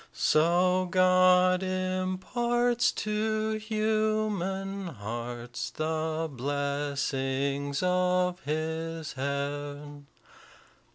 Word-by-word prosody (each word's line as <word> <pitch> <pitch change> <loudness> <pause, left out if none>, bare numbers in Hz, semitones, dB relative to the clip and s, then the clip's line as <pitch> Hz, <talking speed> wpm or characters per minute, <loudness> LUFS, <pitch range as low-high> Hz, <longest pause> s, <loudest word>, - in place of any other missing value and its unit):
So 180 +3 +3
God 185 0 +5
imparts 185 +6 0
to 215 0 -1
human 215 -3 -1
hearts 120 -1 -5
The 160 +3 -2
blessings 140 +1 -1
of 180 0 +2
his 160 +2 -3
heaven. 145 +1 -4
175 Hz, 60 wpm, -28 LUFS, 145-190 Hz, -, God